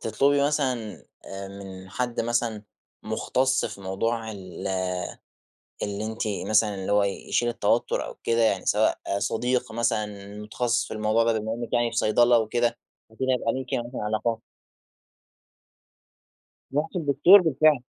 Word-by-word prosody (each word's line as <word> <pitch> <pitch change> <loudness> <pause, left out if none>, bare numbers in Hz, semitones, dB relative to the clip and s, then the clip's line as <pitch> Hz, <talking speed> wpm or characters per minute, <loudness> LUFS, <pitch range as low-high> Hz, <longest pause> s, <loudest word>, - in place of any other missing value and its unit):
تطلبي 140 +6 +2
مثلًا 145 -4 +1 0.5
آآ 95 0 -7
من 95 -1 -10
حد 120 +2 -2
مثلًا، 115 -2 -1 0.4
مختص 130 +1 0
في - - -6
موضوع 110 +4 -2
ال 95 -4 -8 1.2
اللي 100 +1 -3
أنتِ 110 +1 -5 0.3
مثلًا 105 -1 +3
اللي 95 +1 -4
هو 105 0 +4
يشيل 100 +4 -1
التوتر 120 - 0
أو - - -8
كده؟ 115 0 +2
يعني 100 -4 +2
سواء 110 +1 +2 0.2
صديق 125 +3 -1
مثلًا 105 -3 -2
متخصص 115 +3 -1
في - - -6
الموضوع 110 +1 +2
ده 115 -1 +1
بما 110 +1 -3
إنك 120 0 -6
يعني 120 -1 +2
في 115 - -6
صيدلة 120 +2 +4
وكده، 120 +1 0 0.3
فأكيد 130 +4 -3
هيبقى 125 -3 +1
ليكِ 130 -1 -5
يعني 120 0 -2
علاقات؟ 110 +1 -1 2.3
رحتِ 155 +5 -1
لدكتور 165 +5 +6
بالفعل. 155 -4 +3
115 Hz, 135 wpm, -26 LUFS, 105-125 Hz, 2.3 s, لدكتور